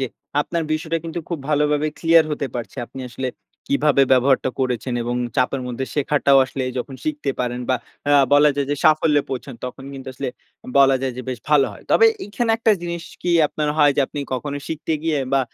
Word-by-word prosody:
যে 130 - 0 0.3
আপনার 165 +2 -2
বিষয়টা 160 +1 -1
কিন্তু 165 +1 -4
খুব 170 - -3
ভালোভাবে 150 0 +2
ক্লিয়ার 165 -1 +5
হতে 145 -2 -2
পারছি। 120 -2 -6
আপনি 135 - -10
আসলে 130 +1 -3 0.4
কিভাবে 140 0 +3
ব্যবহারটা 130 +1 +3
করেছেন 125 -1 -1
এবং 120 +1 -2 0.2
চাপের 130 +1 +1
মধ্যে 125 +1 -3
শেখাটাও 140 -1 +3
আসলে 135 -1 -4 0.2
যখন 135 +2 -5
শিখতে 150 -2 -2
পারেন 125 0 -2
বা 130 - +3 0.3
আ - - +5 0.2
বলা 145 +1 +6
যায় 140 -1 0
যে 145 - 0
সাফল্যে 150 -2 +4
পৌঁছান, 130 0 -5
তখন 130 +1 -7
কিন্তু 135 -1 -8
আসলে 135 +1 -3 0.5
বলা 135 -1 +6
যায় 130 -2 -1
যে, 130 - -5
বেশ 125 -2 -3
ভালো 145 -3 +5
হয়। - - -13
তবে 455 - +6 0.2
এখানে 225 +3 -1
একটা 225 -1 +3
জিনিস 170 -1 -4 0.2
কি 175 - 0 0.2
আপনার 150 -1 -2
হয়, 145 -2 +5
যে - - +3
আপনি 145 - -8 0.2
কখনো 140 +2 -4
শিখতে 160 0 -3
গিয়ে 160 -2 0
বা 135 - +4
140 Hz, 195 wpm, -21 LUFS, 130-155 Hz, 0.5 s, বলা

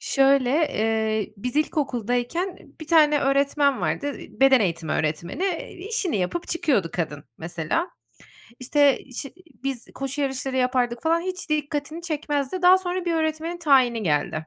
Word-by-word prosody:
Şöyle, 270 -2 +3
eee, 220 - 0
biz 250 +7 -4
ilkokuldayken, 280 - -1 0.2
1 315 - -7
tane 300 -2 +5
öğretmen 280 0 +2
vardı, 285 -1 -1
beden 270 -2 +3
eğitimi 165 -5 -1
öğretmeni, 165 - -2
e, 360 -4 -3
işini 380 - -2
yapıp 195 - -2
çıkıyordu 260 - +1
kadın 150 -4 -3
mesela. 170 - -2 0.7
İşte 285 +2 +3 0.2
şi 275 - -5 0.3
biz 265 -3 -3
koşu 275 +2 -4
yarışları 265 -1 -2
yapardık 250 -2 0
falan, 330 +1 +2
hiç 370 -3 -5
dikkatini 300 +2 -2
çekmezdi. 300 0 -2
Daha 365 +1 +7
sonra 365 -1 -3
bir 345 - 0
öğretmenin 320 +2 -1
tayini 260 -8 +3
geldi. 155 -1 -1
275 Hz, 135 wpm, -24 LUFS, 235-320 Hz, 0.7 s, Daha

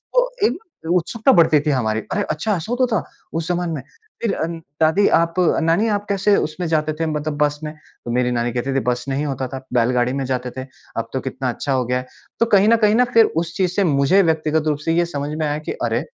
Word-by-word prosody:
तो - - +4 0.2
एक - - -2 0.4
उत्सुकता 220 +8 +2
बढ़ती 160 -3 +5
थी 150 - -1
हमारी, 110 -5 0
"अरे! - - 0
अच्छा 175 +8 -1
ऐसा 170 +7 -6
होता 250 +1 +2
था - - -2 0.3
उस 165 -1 -3
ज़माने 175 -1 -1
में? 145 - -4 0.4
फिर 230 - 0 0.5
दादी 160 +6 +4
आप 165 0 +1 0.3
नानी 170 +7 +2
आप 205 -1 -1
कैसे 200 +1 +3
उसमें 170 +3 -2
जाते 155 -1 0
थे 165 - +1
मतलब 150 -1 -3
बस 150 0 +1
में?" 155 0 -5 0.3
तो 120 - -3
मेरी 125 +1 +1
नानी 120 0 0
कहती 125 +2 -2
थी, - - +3
"बस 125 -1 -1
नहीं 135 +2 -1
होता 135 -2 -3
था, 130 +1 -7
बैलगाड़ी 125 +1 +2
में 135 0 -2
जाते 125 -1 -2
थे, 130 - -4 0.3
अब 115 0 -3
तो 130 - 0
कितना 130 0 -3
अच्छा 135 +3 -3
हो 130 -1 +1
गया 125 +1 0
है।" 125 - -9 0.3
तो 230 - +4
कहीं 200 +1 +6
न 230 - +6
कहीं 210 +1 +4
ना 250 +2 +4
फिर 230 -1 +7 0.2
उस 170 0 -9
चीज़ 185 -3 +1
से 200 - +3
मुझे 145 +3 +4
व्यक्तिगत 160 -1 +1
रूप 150 -1 +1
से 165 - +2
ये 175 - +3
समझ 145 -4 -4
में 155 - 0
आया 145 0 -1
कि - - -1
अरे, - - 0
155 Hz, 240 wpm, -20 LUFS, 130-180 Hz, 0.5 s, फिर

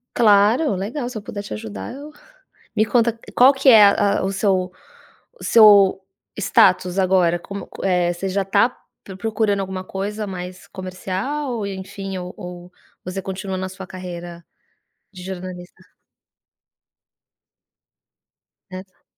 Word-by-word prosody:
Claro, 215 +4 +4
legal. 240 +7 -4
Se 250 - -7
eu - - -6
puder 205 - -6
te 200 - -8
ajudar, 100 -3 -7
eu 290 +2 -10 0.6
me 215 0 +2
conta 235 -1 +1 0.2
qual 255 +3 +7
que 270 0 0
é 220 -4 +9
a 200 0 +3
a - - -2
o 195 - -1
seu 190 -2 0 0.7
o - - -10
seu 200 -4 +6 0.4
status 180 -2 +3
agora 185 -2 +3
como 200 +3 -8
co - - -10
eh, 180 -2 +1
você 190 +2 -4
já 195 +1 0
está 195 +5 +2 0.3
pro 190 -2 -9
procurando 215 -2 0
alguma 190 -1 -5
coisa 205 +3 -4
mais 180 -1 -7
comercial 195 +10 -4
ou 215 -4 -3
enfim, 195 0 -6
ou 180 0 -6
ou 180 0 -10 0.3
você 185 +2 -4
continua 190 0 -5
na 190 0 -3
sua 190 0 -9
carreira 175 -2 -8 0.7
de 185 -2 -11
jornalista? 185 -1 -8 2.9
Nessa 185 0 -11
190 Hz, 140 wpm, -21 LUFS, 185-210 Hz, 2.9 s, é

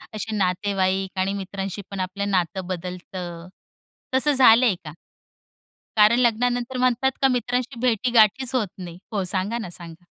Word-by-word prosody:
असे 215 0 -4
नातेवाईक 190 0 0
आणि 190 +1 0
मित्रांशी 195 0 -5
पण 195 - -5
आपलं 200 +2 -3
नातं 185 0 -1
बदलतं, 180 -1 -6 0.7
तसं 290 +3 +3
झालंय 245 -4 +6
का? 150 - -7 1.0
कारण 215 +3 +5
लग्नानंतर 245 +1 +1
म्हणतात 255 +1 +2
का 270 - +6
मित्रांशी 245 +1 -2
भेटीगाठीच 245 +1 +3
होत 220 -7 +1
नाही 175 -1 -8
हो, 200 -3 -1
सांगा 195 +5 0
ना, 195 -7 -6
सांगा? 170 0 -10
200 Hz, 135 wpm, -23 LUFS, 185-245 Hz, 1.0 s, झालंय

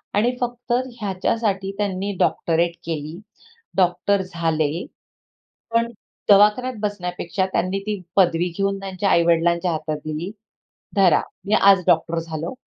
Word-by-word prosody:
आणि 240 +5 +2
फक्त 245 0 -2 0.3
ह्याच्यासाठी 195 0 -1
त्यांनी 200 -1 -1
डॉक्टरेट 170 +1 +1
केली. 160 +1 -4 0.6
डॉक्टर 185 +2 +2
झाले. 165 -2 -1 0.9
पण 235 0 +2 0.4
दवाखान्यात 210 +6 +5
बसण्यापेक्षा 185 -2 -2
त्यांनी 185 +3 0
ती 210 -2 -2 0.2
पदवी 175 -2 +3
घेऊन 195 0 0
त्यांच्या 195 0 -2
आई-वडिलांच्या 170 +1 +3
हातात 155 -1 -3
दिली 155 +4 -4 0.7
"धरा, 185 -5 +5 0.3
मी 205 - -1
आज 195 -3 +6
डॉक्टर 165 0 +2
झालो 160 0 -5
185 Hz, 115 wpm, -22 LUFS, 170-200 Hz, 0.9 s, आज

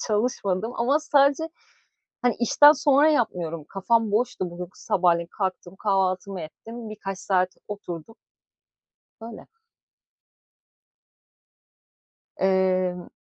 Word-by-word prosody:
çalışmadım 215 -2 -1
ama 270 +6 +2
sadece 290 +1 +3 0.7
hani 245 -3 +2
işten 290 +5 +7
sonra 290 0 +4
yapmıyorum 175 - -1
kafam 220 +2 +1
boştu. 220 -4 -1
Bugün 175 0 -7
sabahleyin 175 -5 +1
kalktım 185 -1 -3
kahvaltımı 190 -1 -1
ettim 225 +8 -9
birkaç 195 -3 -6
saat 185 -2 +1 0.2
oturdum. 200 -1 -7 1.1
Böyle. 225 0 -10 2.9
Imm, 185 -1 +1
200 Hz, 85 wpm, -25 LUFS, 185-240 Hz, 2.9 s, işten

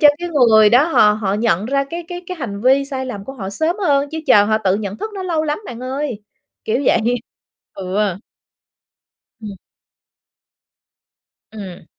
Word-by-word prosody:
cho 295 - +8
cái 350 - -4
người 225 -9 +5
đó 250 +5 +5
họ 215 -10 +4
họ 205 -2 -2
nhận 215 -3 0
ra 275 +2 0
cái 340 +1 -5
cái 355 0 -6
cái 365 0 -6
hành 205 -9 -5
vi 265 +3 +3
sai 265 -2 -4
lầm 205 -6 -6
của 270 - -7
họ 200 -8 -6
sớm 315 - -1
hơn, 280 0 +2
chứ 320 - -4
chờ 210 -6 +6
họ 215 +1 +1
tự 190 -3 +1
nhận 205 -1 -5
thức 435 - -5
nó 385 - -5
lâu 335 -4 -1
lắm 300 +3 -1
bạn 240 -1 -8
ơi. 255 -4 -4 0.4
Kiểu 235 +5 0
vậy - - +4 0.8
Ừ. 195 +1 -1 1.3
Ừm. 210 -2 -7 2.0
Ừm. 190 -6 -9
245 Hz, 175 wpm, -18 LUFS, 210-295 Hz, 2.0 s, cho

